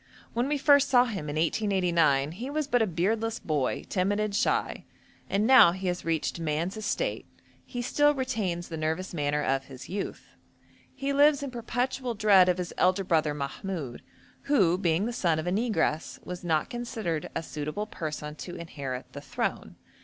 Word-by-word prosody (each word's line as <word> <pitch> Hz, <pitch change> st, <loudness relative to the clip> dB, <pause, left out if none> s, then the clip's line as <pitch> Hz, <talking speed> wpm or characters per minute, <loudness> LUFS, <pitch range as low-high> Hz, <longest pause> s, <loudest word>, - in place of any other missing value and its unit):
When 240 Hz, +3 st, 0 dB
we 295 Hz, +1 st, 0 dB
first 285 Hz, 0 st, +5 dB
saw 250 Hz, -1 st, +6 dB
him, 195 Hz, -11 st, -4 dB
in 145 Hz, -, -4 dB
1889, 165 Hz, -5 st, +2 dB
he 235 Hz, +10 st, -6 dB
was 305 Hz, +1 st, -1 dB
but 245 Hz, -4 st, +2 dB
a 220 Hz, -, +3 dB
beardless 215 Hz, +6 st, 0 dB
boy, 145 Hz, -5 st, -1 dB
timid 200 Hz, +2 st, 0 dB
and 215 Hz, -1 st, -1 dB
shy, -, -, 0 dB, 0.4 s
and 200 Hz, +2 st, +1 dB
now 230 Hz, -8 st, +8 dB
he 190 Hz, +1 st, -6 dB
has 180 Hz, 0 st, -3 dB
reached 165 Hz, +1 st, -1 dB
man's 165 Hz, +4 st, -1 dB
estate 220 Hz, -, -2 dB, 0.4 s
he 245 Hz, -2 st, -5 dB
still 290 Hz, +4 st, +3 dB
retains 200 Hz, -10 st, -2 dB
the 165 Hz, -, -5 dB
nervous 160 Hz, +5 st, -2 dB
manner 150 Hz, -2 st, 0 dB
of 135 Hz, -1 st, 0 dB
his 130 Hz, -1 st, -11 dB
youth. 195 Hz, +1 st, -5 dB, 0.7 s
He 275 Hz, +1 st, -2 dB
lives 285 Hz, 0 st, +4 dB
in 275 Hz, -, -4 dB
perpetual 245 Hz, +1 st, -2 dB
dread 200 Hz, -4 st, +5 dB
of 180 Hz, -, +2 dB
his 180 Hz, -1 st, -4 dB
elder 185 Hz, +2 st, +3 dB
brother 155 Hz, -4 st, +1 dB
Mahmoud, 145 Hz, -1 st, -5 dB, 0.4 s
who, 200 Hz, -, +4 dB
being 175 Hz, +1 st, +1 dB
the 240 Hz, -, -2 dB
son 170 Hz, -8 st, +1 dB
of 160 Hz, -, -3 dB
a 175 Hz, -, -1 dB
negress, 205 Hz, -7 st, 0 dB
was 180 Hz, 0 st, -6 dB
not 160 Hz, -3 st, 0 dB
considered 220 Hz, -10 st, -3 dB
a -, -, -2 dB
suitable 155 Hz, +7 st, -4 dB
person 150 Hz, -6 st, -5 dB
to 175 Hz, -, -7 dB
inherit 140 Hz, -6 st, -6 dB
the -, -, -7 dB
throne. -, -, -3 dB
185 Hz, 175 wpm, -28 LUFS, 160-235 Hz, 0.7 s, now